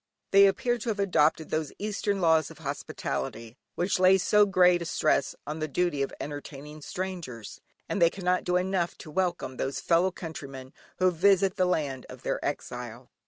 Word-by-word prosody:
They 200 0 +8
appear 240 +5 0
to 230 - -4
have 210 -2 -2
adopted 160 -5 +2
those 155 -2 -1
Eastern 205 -1 -2
laws 160 -2 +3
of 165 - -13
hospitality, 140 -5 -5 0.2
which 180 +2 0
lay 185 +1 +6
so 210 +2 +4
great 180 -2 +4
a - - -3
stress 155 -3 +1
on 150 +2 -5
the 155 - -2
duty 155 -1 0
of 135 - -1
entertaining 145 +1 -8
strangers, 170 - -6 0.3
and 200 - -2
they 170 - +7
cannot 180 0 -1
do 180 - 0
enough 180 -1 -1
to 155 - -11
welcome 175 -7 -1
those 135 +1 -2
fellow 170 +2 +3
countrymen 140 -7 -8 0.2
who 185 0 +3
visit 190 +2 +3
the 185 - +2
land 145 -7 -2
of - - -11
their - - -2
exile. 120 0 -5
170 Hz, 175 wpm, -28 LUFS, 145-190 Hz, 0.3 s, They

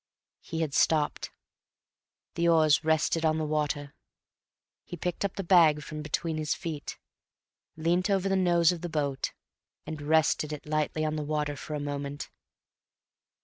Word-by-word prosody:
He 165 0 -5
had 155 -4 -2
stopped. 155 0 +1 1.0
The 170 0 +1
oars 155 -3 +4
rested 160 +1 +1
on 155 0 +2
the 155 - -1
water. 150 -2 -2 0.9
He 175 - -8
picked 180 +2 -3
up 200 - -2
the 195 - -3
bag 165 -5 +5
from 155 0 -6
between 155 +2 -2
his 155 0 -1
feet, 160 -5 -6 0.8
leant 175 +4 +1
over 195 -1 +1
the 195 - +1
nose 175 -2 +4
of 175 -2 -5
the 175 - -4
boat, 145 -4 -1 0.5
and 155 -1 -6
rested 155 0 +2
it 150 - -8
lightly 155 +1 -1
on 155 0 -1
the 150 - -2
water 150 -1 -1
for 150 +2 -6
a - - -2
moment. 145 0 -5
155 Hz, 155 wpm, -28 LUFS, 150-170 Hz, 1.0 s, bag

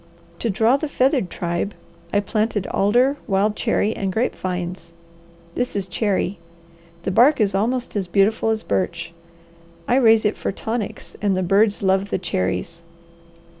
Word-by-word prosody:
To 230 - -1
draw 225 +6 +3
the 310 - -3
feathered 265 - +1
tribe, 175 +3 -3 0.4
I 205 - +2
planted 215 -1 -1
alder, 245 +8 +3
wild 205 +1 +1
cherry, 215 +2 0
and 195 -1 -2
grape 225 +6 0
vines. 180 -2 -5 0.6
This 245 -3 -2
is 200 -2 -1
cherry. 195 -1 -1 0.6
The 190 - -1
bark 250 +10 +5
is 205 -3 +2
almost 235 +6 -1
as 195 -3 -1
beautiful 205 +4 +2
as 220 0 0
birch. 170 -2 -2 0.7
I 245 - +3
raise 225 -4 +5
it 210 - +1
for - - -2
tonics 220 +2 -5
and 200 -2 +1
the 185 - 0
birds 200 +3 +2
love 190 +1 +2
the - - 0
cherries. 95 - -2
205 Hz, 155 wpm, -21 LUFS, 185-225 Hz, 0.7 s, bark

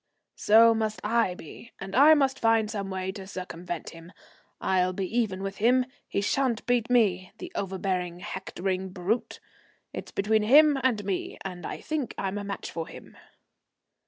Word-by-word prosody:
"So 230 +2 +6
must 220 -1 -2
I 220 -4 +1
be, 180 +8 -12
and 190 +1 -6
I 295 +5 +8
must 270 -2 +1
find 225 -1 +3
some 200 -3 -4
way 190 0 -3
to 190 0 -9
circumvent 180 -3 -6
him. 165 +3 -13 0.5
I'll 185 -1 +1
be 190 +1 -2
even 200 -5 0
with 195 0 -4
him. 250 +4 +3 0.2
He 200 - -1
sha'n't 245 +2 0
beat 245 -1 +1
me, 195 -7 +2
the 360 -1 -8
overbearing, 185 -2 -2
hectoring 190 0 -3
brute. 185 +5 -2 0.5
It's - - -7
between 215 +2 +2
him 285 +6 +6
and 225 -6 +1
me, 195 -2 -3
and 180 -3 -5
I - - -6
think 305 -5 -3
I'm 195 +1 -2
a - - -5
match 200 0 -5
for 165 -1 -4
him." - - -12
200 Hz, 165 wpm, -27 LUFS, 185-235 Hz, 0.5 s, I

